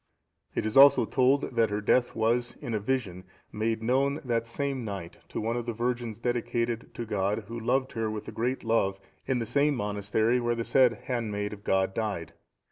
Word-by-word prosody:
It -, -, -1 dB
is 110 Hz, +4 st, 0 dB
also 140 Hz, +1 st, +8 dB
told, 135 Hz, +1 st, +2 dB
that 115 Hz, -1 st, +3 dB
her 105 Hz, 0 st, -1 dB
death 120 Hz, +4 st, +2 dB
was, 120 Hz, +2 st, +1 dB
in 115 Hz, -, -5 dB
a 110 Hz, -, +1 dB
vision, 100 Hz, -6 st, -2 dB, 0.3 s
made 110 Hz, +1 st, -1 dB
known 135 Hz, +4 st, +1 dB
the 120 Hz, -2 st, +1 dB
same 135 Hz, +2 st, -3 dB
night 100 Hz, -6 st, -6 dB
to -, -, -4 dB
one 115 Hz, +2 st, -1 dB
of 120 Hz, -1 st, -3 dB
the 120 Hz, -, -1 dB
virgins 120 Hz, -1 st, -2 dB
dedicated 120 Hz, -1 st, -1 dB
to 120 Hz, -, -4 dB
God, 105 Hz, 0 st, -1 dB
who 115 Hz, +1 st, -5 dB
loved 130 Hz, +3 st, 0 dB
her 115 Hz, -1 st, -2 dB
with 110 Hz, 0 st, -5 dB
a -, -, -5 dB
great 125 Hz, +3 st, -2 dB
love, 100 Hz, -4 st, +1 dB, 0.3 s
in 130 Hz, -, +1 dB
the 115 Hz, -, -2 dB
same 140 Hz, +5 st, +2 dB
monastery 105 Hz, +2 st, 0 dB
where 120 Hz, -1 st, 0 dB
the 115 Hz, -, -2 dB
said 125 Hz, -2 st, +3 dB
handmaid 105 Hz, -4 st, -2 dB
of 100 Hz, -1 st, -11 dB
God 95 Hz, -1 st, +1 dB
died. 100 Hz, -7 st, -3 dB
115 Hz, 200 wpm, -28 LUFS, 105-125 Hz, 0.3 s, also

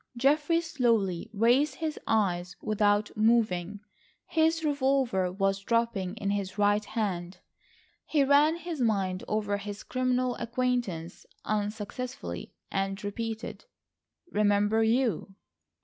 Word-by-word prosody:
Geoffrey 295 Hz, +6 st, +3 dB
slowly 230 Hz, -, 0 dB
raised 240 Hz, +7 st, +3 dB
his 315 Hz, -2 st, -3 dB
eyes 180 Hz, -4 st, +1 dB
without 210 Hz, 0 st, +1 dB
moving—his 220 Hz, -, 0 dB
revolver 265 Hz, -, +1 dB
was 195 Hz, +1 st, 0 dB
drooping 230 Hz, -4 st, 0 dB
in 200 Hz, -3 st, -2 dB
his 200 Hz, -1 st, -3 dB
right 205 Hz, 0 st, +3 dB
hand. 185 Hz, -6 st, -3 dB, 0.7 s
He 295 Hz, -3 st, +3 dB
ran 290 Hz, +3 st, +5 dB
his 340 Hz, -4 st, -5 dB
mind 195 Hz, -5 st, 0 dB
over 210 Hz, -1 st, 0 dB
his 205 Hz, 0 st, -7 dB
criminal 255 Hz, -1 st, 0 dB
acquaintance 235 Hz, -9 st, -2 dB, 0.2 s
unsuccessfully, 210 Hz, -, -4 dB, 0.2 s
and 195 Hz, +1 st, -2 dB
repeated: 225 Hz, -, -5 dB, 0.7 s
"Remember 205 Hz, +1 st, +3 dB
you?" 225 Hz, -3 st, +1 dB
215 Hz, 100 wpm, -29 LUFS, 200-255 Hz, 0.7 s, ran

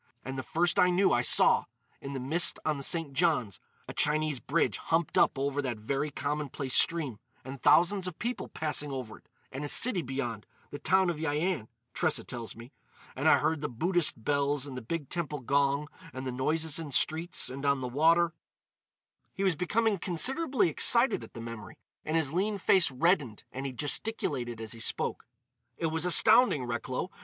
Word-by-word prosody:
—and 135 Hz, +1 st, -5 dB
the 130 Hz, -, -3 dB
first 170 Hz, +6 st, 0 dB
I 180 Hz, -, +5 dB
knew 185 Hz, +2 st, +2 dB
I 120 Hz, -, +2 dB
saw, -, -, +4 dB, 0.4 s
in 140 Hz, -, -7 dB
the 135 Hz, -, -4 dB
mist 155 Hz, +7 st, +1 dB
on 155 Hz, -2 st, 0 dB
the -, -, -7 dB
St. 160 Hz, -2 st, -2 dB
Johns, 135 Hz, -, 0 dB, 0.3 s
a -, -, -7 dB
Chinese 150 Hz, -2 st, +1 dB
bridge 155 Hz, +8 st, 0 dB
humped 165 Hz, -1 st, -1 dB
up -, -, +3 dB
over 140 Hz, +1 st, -1 dB
that 125 Hz, -5 st, -4 dB
very 135 Hz, +7 st, -2 dB
commonplace 145 Hz, -2 st, -4 dB
stream, 150 Hz, -10 st, +2 dB, 0.3 s
and 130 Hz, 0 st, -8 dB
thousands 185 Hz, +2 st, +4 dB
of 180 Hz, -, -7 dB
people 245 Hz, +2 st, -4 dB
passing 150 Hz, -2 st, -2 dB
over 130 Hz, -5 st, -7 dB
it,—and 135 Hz, +2 st, -11 dB
a -, -, -3 dB
city 210 Hz, -, +2 dB
beyond—the 130 Hz, 0 st, -7 dB
town 190 Hz, -1 st, +2 dB
of 165 Hz, -, -6 dB
Yian, 155 Hz, -, -2 dB, 0.3 s
Tressa 160 Hz, -3 st, 0 dB
tells 120 Hz, -3 st, -6 dB
me,—and 115 Hz, +3 st, -8 dB
I -, -, +6 dB
heard 160 Hz, -2 st, -1 dB
the 150 Hz, -, -3 dB
Buddhist 160 Hz, -1 st, +1 dB
bells 145 Hz, 0 st, 0 dB
and 135 Hz, -3 st, -8 dB
the 125 Hz, -, -6 dB
big 145 Hz, +5 st, -5 dB
temple 150 Hz, -4 st, -4 dB
gong 140 Hz, +3 st, +1 dB, 0.3 s
and 130 Hz, +1 st, -6 dB
the 130 Hz, -, -3 dB
noises 155 Hz, +5 st, -1 dB
in 155 Hz, -3 st, -7 dB
streets 160 Hz, +1 st, +1 dB
and 135 Hz, +2 st, -7 dB
on 140 Hz, -1 st, +1 dB
the 125 Hz, -, -3 dB
water——" 165 Hz, +6 st, +2 dB, 1.0 s
He 195 Hz, -, -3 dB
was 185 Hz, -4 st, +2 dB
becoming 205 Hz, +4 st, 0 dB
considerably 255 Hz, -, +2 dB
excited 235 Hz, -, +3 dB
at 115 Hz, -, -14 dB
the 115 Hz, -, -7 dB
memory, 115 Hz, -4 st, -9 dB, 0.3 s
and 155 Hz, +1 st, -1 dB
his 155 Hz, -3 st, -1 dB
lean 200 Hz, +4 st, 0 dB
face 190 Hz, -1 st, +3 dB
reddened 140 Hz, -, 0 dB
and 135 Hz, +2 st, -5 dB
he -, -, -5 dB
gesticulated 130 Hz, -, -1 dB
as 110 Hz, -1 st, -7 dB
he 115 Hz, -, -7 dB
spoke: 115 Hz, -, -2 dB, 0.5 s
"It 165 Hz, -2 st, -2 dB
was 160 Hz, +1 st, -1 dB
astounding, 215 Hz, -, +5 dB
Recklow! 125 Hz, +7 st, -4 dB
150 Hz, 180 wpm, -29 LUFS, 130-170 Hz, 1.0 s, I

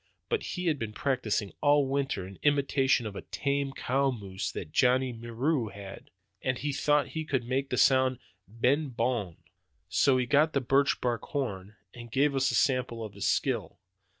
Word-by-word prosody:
But 460 Hz, -, 0 dB, 0.2 s
he 180 Hz, -, -3 dB
had 155 Hz, -4 st, +1 dB
been 110 Hz, -2 st, -4 dB
practicing 110 Hz, -6 st, -1 dB
all 145 Hz, -1 st, +4 dB
winter 135 Hz, -8 st, -1 dB
in 95 Hz, +1 st, -11 dB
imitation 140 Hz, -3 st, +2 dB
of 105 Hz, -2 st, -5 dB
a -, -, -5 dB
tame 140 Hz, -1 st, -2 dB
cow 135 Hz, +1 st, 0 dB
moose 100 Hz, -6 st, -4 dB
that 80 Hz, -, -7 dB
Johnny 130 Hz, -, +3 dB
Moreau 120 Hz, +3 st, -1 dB
had, 100 Hz, -1 st, -10 dB, 0.3 s
and 130 Hz, -1 st, -1 dB
he 145 Hz, +1 st, -2 dB
thought 145 Hz, 0 st, +2 dB
he 160 Hz, +4 st, -4 dB
could 135 Hz, -5 st, -1 dB
make 135 Hz, +2 st, -1 dB
the -, -, -1 dB
sound 130 Hz, -1 st, +4 dB, 0.3 s
'b'en 130 Hz, +7 st, +1 dB
bon.' 115 Hz, -8 st, -1 dB, 0.5 s
So 135 Hz, -2 st, +3 dB
he 125 Hz, -, +1 dB
got 150 Hz, +5 st, +3 dB
the 140 Hz, -, +2 dB
birch 135 Hz, +2 st, +2 dB
bark 120 Hz, -3 st, 0 dB
horn 105 Hz, -8 st, -4 dB, 0.2 s
and 120 Hz, -1 st, -10 dB
gave 140 Hz, +3 st, +2 dB
us 135 Hz, 0 st, +2 dB
a -, -, -1 dB
sample 125 Hz, -5 st, +1 dB
of 105 Hz, -, -9 dB
his 100 Hz, -1 st, -2 dB
skill. 125 Hz, -, 0 dB
130 Hz, 180 wpm, -29 LUFS, 115-140 Hz, 0.5 s, all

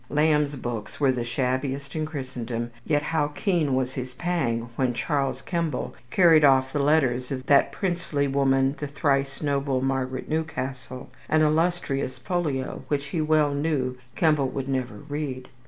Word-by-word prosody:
Lamb's 150 Hz, -1 st, +2 dB
books 120 Hz, -5 st, -5 dB
were 140 Hz, -3 st, +4 dB
the 125 Hz, -2 st, -2 dB
shabbiest 130 Hz, +3 st, -2 dB
in 155 Hz, -1 st, -1 dB
Christendom; 125 Hz, -5 st, -4 dB
yet 145 Hz, +1 st, +1 dB
how 155 Hz, -1 st, +1 dB
keen 150 Hz, -2 st, 0 dB
was 130 Hz, 0 st, 0 dB
his 125 Hz, -1 st, -5 dB
pang 125 Hz, -8 st, -1 dB
when 125 Hz, -2 st, 0 dB
Charles 135 Hz, -3 st, -1 dB
Kemble 170 Hz, -6 st, -2 dB, 0.2 s
carried 165 Hz, -1 st, +6 dB
off 130 Hz, -2 st, +4 dB
the 145 Hz, -, 0 dB
letters 135 Hz, -4 st, +2 dB
of 130 Hz, -1 st, -4 dB
"that 140 Hz, 0 st, +4 dB
princely 170 Hz, -4 st, -1 dB
woman, 135 Hz, -1 st, +2 dB
the 145 Hz, -, -3 dB
thrice 140 Hz, -1 st, 0 dB
noble 140 Hz, -2 st, 0 dB
Margaret 130 Hz, -1 st, -2 dB
Newcastle," 130 Hz, -5 st, -4 dB, 0.2 s
an 155 Hz, 0 st, +4 dB
"illustrious 155 Hz, -4 st, +1 dB
folio" 155 Hz, -8 st, -2 dB
which 145 Hz, -1 st, -1 dB
he 160 Hz, +1 st, -1 dB
well 155 Hz, -2 st, +3 dB
knew 140 Hz, -4 st, 0 dB, 0.2 s
Kemble 150 Hz, -5 st, +3 dB
would 135 Hz, 0 st, -4 dB
never 130 Hz, -2 st, -2 dB
read. 140 Hz, -4 st, -4 dB
140 Hz, 155 wpm, -25 LUFS, 130-155 Hz, 0.2 s, carried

